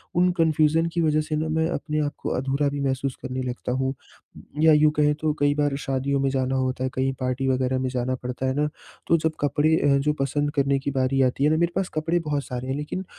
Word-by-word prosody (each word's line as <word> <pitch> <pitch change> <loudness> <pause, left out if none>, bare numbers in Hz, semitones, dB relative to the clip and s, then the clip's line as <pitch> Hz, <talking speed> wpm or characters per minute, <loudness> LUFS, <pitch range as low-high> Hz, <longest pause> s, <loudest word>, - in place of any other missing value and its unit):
उन 180 +1 +4
कन्फ्यूजन 160 0 +3
की 170 - 0
वज़ह 155 -1 +2
से 155 0 -3
ना 155 +1 -1
मैं 160 +1 +1
अपने 155 -3 -2
आपको 145 -1 -3
अधूरा 135 +2 0
भी 145 - -4
महसूस 135 -1 -1
करने 130 0 -4
लगता 125 0 -4
हूँ। 130 +1 0 0.7
या 160 -1 +6
यूँ 150 0 +5
कहें 150 -1 +2
तो 155 0 -1
कई 145 0 +3
बार 145 -2 +1
शादियों 135 0 -1
में 135 - +1
जाना 130 0 0
होता 130 0 -1
है, 130 - 0
कहीं 135 +1 0
पार्टी 130 +1 -1
वग़ैरह 130 0 +1
में 130 0 -1
जाना 125 0 -1
पड़ता 125 +1 -5
है 130 - +1
ना, 150 +1 +1 0.4
तो 165 - +4
जब 160 0 0
कपड़े 145 +2 +2
अ, 140 -1 +3
जो 150 +2 +1
पसंद 145 +2 0
करने 140 0 +2
की 140 +1 -3
बारी 135 0 +1
आती 130 +1 +1
है 150 - +5
ना 155 - +2
मेरे 170 +1 +1
पास 195 -1 -1
कपड़े 165 +3 0
बहुत 150 -3 -2
सारे 125 0 -5
हैं 135 - -1
लेकिन 150 +6 -4
140 Hz, 240 wpm, -24 LUFS, 130-155 Hz, 0.7 s, या